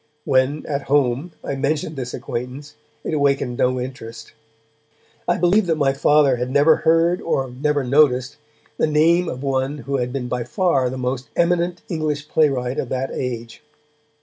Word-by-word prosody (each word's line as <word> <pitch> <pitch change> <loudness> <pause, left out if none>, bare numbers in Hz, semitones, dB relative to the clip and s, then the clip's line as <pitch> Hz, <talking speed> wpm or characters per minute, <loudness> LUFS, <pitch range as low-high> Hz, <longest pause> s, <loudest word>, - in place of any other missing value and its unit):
When, 130 +3 +1
at 140 -1 -2
home, 140 +3 +1
I - - -3
mentioned 145 +3 -2
this 125 -2 -5
acquaintance, 130 +5 -6 0.3
it - - -3
awakened 140 -4 0
no 130 0 +2
interest. 115 -3 -8 0.9
I - - +2
believe 180 +3 +3
that 165 - +2
my 140 -3 +2
Father 140 -1 +3
had 125 +1 -3
never 145 +4 +4
heard, 165 +2 +2
or 135 -6 -1
never 145 +2 0
noticed, 130 -1 +2 0.4
the - - +2
name 165 +3 +3
of 130 +2 -6
one 135 +1 -1
who 140 0 -3
had 125 -1 -2
been 130 -2 -3
by 125 0 -2
far 135 - +1
the 130 - -5
most 125 +1 -3
eminent 175 0 +1
English 155 -3 -3
playwright 135 -4 +1
of 125 - -3
that 130 +1 -2
age. 120 -3 -5
140 Hz, 165 wpm, -21 LUFS, 125-155 Hz, 0.9 s, never